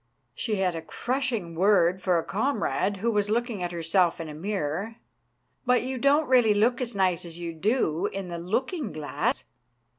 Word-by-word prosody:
She 220 -3 -2
had 185 -3 0
a 165 - -4
crushing 240 -6 -2
word 185 0 +3
for 180 -2 +2
a 165 - 0
comrade 210 -3 0
who 230 +5 0
was 205 -1 +1
look 240 +3 0
ing 205 -5 -5
at 175 0 -2
herself 170 +1 +1
in 165 -2 -5
a - - -7
mirror. 190 +4 -3 0.3
" - - -46
But 250 -1 +4
you 260 0 -3
don't 285 +4 +3
really 245 -5 +5
look 235 +4 +2
as 245 -2 -2
nice 185 -3 +1
as 170 -1 -9
you 170 -1 -5
do 185 -1 +1
in 195 -2 -5
the 170 -1 -5
looking 250 - -2
glass 150 -1 -2
195 Hz, 190 wpm, -27 LUFS, 170-235 Hz, 0.3 s, really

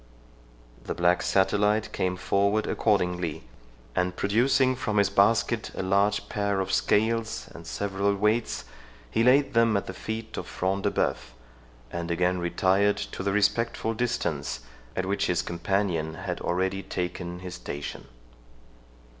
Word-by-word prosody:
The - - -3
black 85 +1 +3
satellite 105 +2 +2
came 90 0 0
forward 100 +3 +1
accordingly, 90 -6 0 0.5
and, 90 0 0
producing 130 +5 +3
from 110 -4 -2
his 100 -1 +3
basket 115 +2 +3
a - - -2
large 100 +2 +2
pair 100 -1 -1
of 95 0 -1
scales 110 +3 +1
and - - -11
several 100 +10 0
weights, 105 +3 0 0.5
he 115 - +2
laid 135 +4 +4
them 115 -2 +4
at 100 - -2
the 95 - -6
feet 110 +3 -5
of - - -4
Front 95 +1 -1
de - - +4
Bœuf, - - -1 0.6
and 85 0 -4
again 90 +2 +1
retired 95 +3 +2
to - - -5
the 100 +1 0
respectful 105 +3 +1
distance, 120 - -2 0.3
at 95 - -1
which 100 +1 0
his 90 -1 +1
companion 85 -2 -1
had 90 0 -4
already 95 +2 0
taken 90 -1 -4
his 90 -1 -6
station. 70 -3 -6
100 Hz, 140 wpm, -27 LUFS, 90-105 Hz, 0.6 s, laid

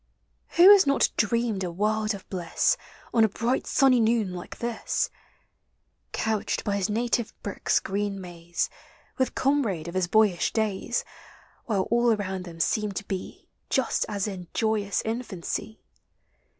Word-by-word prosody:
Who 360 +4 +10
has 400 -6 +7
not 275 - +3
dreamed 225 -2 +1
a 180 - -2
world 215 +4 0
of 195 - -12
bliss 180 - +1 0.4
On 225 - +5
a 220 - +4
bright 235 +5 -1
sunny 265 -2 +4
noon 220 -4 +2
like 175 -1 -8
this, 235 -1 -2 1.0
Couched 220 -2 -1
by 200 -1 0
his 200 +1 -1
native 235 +1 -1
brook's 200 - 0
green 200 0 -2
maze; 175 -2 -3 0.5
With 260 - 0
comrade 235 - +1
of 170 - -6
his 185 -1 +1
boyish 205 -4 +3
days, 220 +1 -1 0.6
While 200 -5 +1
all 240 0 +4
around 190 -3 -3
them 165 -2 -10
seemed 210 +4 0
to 200 - -4
be 190 -2 -6 0.2
Just 265 -3 +1
as 205 -1 -1
in 185 -4 -6
iovous 215 -3 0
infancy? 220 -2 -4
210 Hz, 145 wpm, -26 LUFS, 190-230 Hz, 1.0 s, Who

